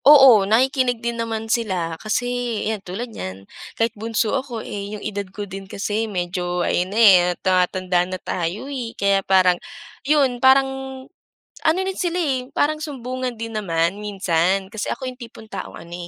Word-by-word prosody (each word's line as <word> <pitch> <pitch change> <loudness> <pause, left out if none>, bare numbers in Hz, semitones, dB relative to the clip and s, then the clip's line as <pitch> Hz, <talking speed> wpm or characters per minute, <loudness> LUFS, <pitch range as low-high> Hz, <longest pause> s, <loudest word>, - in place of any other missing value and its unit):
Oo, 265 -9 +8
nakikinig 255 +2 +3
din 235 +1 -3
naman 225 -1 -3
sila, 190 -8 -1
kasi 220 +3 -1 0.4
yan 215 -1 -2
tulad 220 +6 -6
niyan, 95 - -7 0.3
kahit 225 0 +1
bunso 220 0 -1
ako, 255 -4 -3
eh 205 +1 -5
yung - - -11
edad 205 -2 -4
ko 205 +2 -6
din 195 0 -9
kasi 215 +3 -2
medyo, 180 -1 -2
ayun 180 +1 0
na 205 - -5
eh, 205 -5 +8 0.3
tumatanda 185 -1 +2
na 185 - -3
tayo 180 +4 -3
eh. 255 -5 -5
Kaya 200 0 +3
parang 185 -2 +3 0.4
yun 275 -4 +2
parang 265 0 +2 0.6
ano 320 +3 +4
na 385 - -2
sila 350 -2 -1
eh, 260 -5 -1
parang 305 +1 +2
sumbungan 255 -4 -4
din 230 0 -5
naman 180 -1 0
minsan. 190 -2 +1
Kasi 220 - -3
ako 265 - -7
yung 250 0 -11
tipong 230 -1 -10
taong - - -6
ano 170 +1 -11
215 Hz, 170 wpm, -22 LUFS, 185-255 Hz, 0.6 s, Oo